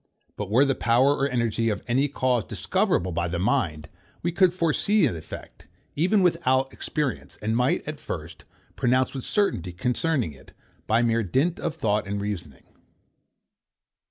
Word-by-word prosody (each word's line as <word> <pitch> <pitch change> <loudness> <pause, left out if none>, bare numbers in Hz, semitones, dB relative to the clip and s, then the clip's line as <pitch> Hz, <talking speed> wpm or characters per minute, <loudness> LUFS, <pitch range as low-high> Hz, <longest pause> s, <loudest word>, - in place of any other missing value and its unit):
But 105 -2 -5
were 125 +7 +5
the 135 - +2
power 125 +4 +3
or 140 - +1
energy 115 -2 0
of 105 - -3
any 130 +4 +2
cause 130 -4 0
discoverable 90 -1 0
by 85 +1 -1
the 85 0 -3
mind, 85 - 0 0.4
we 175 - +1
could 180 +1 +4
foresee 185 +4 +2
the 85 - -1
effect, 80 - -11 0.3
even 185 +6 +3
without 135 -6 +2
experience; 150 -6 -3
and 110 +2 -1
might, 125 +4 +1
at 155 -1 -5
first, 85 0 -7 0.3
pronounce 130 +1 +2
with 135 -2 -5
certainty 195 - 0
concerning 125 - 0
it, 70 - -17 0.3
by 115 +2 +3
mere 115 0 +2
dint 135 - 0
of 155 - -3
thought 105 -1 0
and 100 0 -2
reasoning. 90 -9 -5
125 Hz, 155 wpm, -25 LUFS, 100-145 Hz, 0.4 s, were